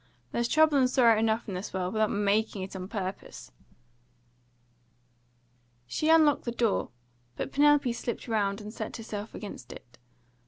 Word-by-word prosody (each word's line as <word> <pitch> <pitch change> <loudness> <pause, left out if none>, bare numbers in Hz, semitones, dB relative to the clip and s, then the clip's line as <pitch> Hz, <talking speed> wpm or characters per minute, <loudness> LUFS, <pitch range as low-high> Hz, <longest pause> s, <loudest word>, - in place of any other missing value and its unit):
There's 235 0 0
trouble 310 0 +4
and 255 -1 +3
sorrow 240 -4 +5
enough 225 +1 0
in 200 - -4
the 185 +2 -5
world, 185 0 -2
without 215 -1 +2
MAKING 205 0 0
it 190 - -8
on 185 -1 -5
purpose!" 195 -3 -6 2.3
She 305 - -1
unlocked 315 -3 +5
the 235 - -1
door, 230 -3 0 0.5
but - - -4
Penelope 290 -3 +4
slipped 235 +1 -5
round 205 -2 0
and 210 +1 -8
set - - -5
herself 215 -1 -7
against 135 - -8
it. 120 0 -13
220 Hz, 150 wpm, -28 LUFS, 200-250 Hz, 2.3 s, sorrow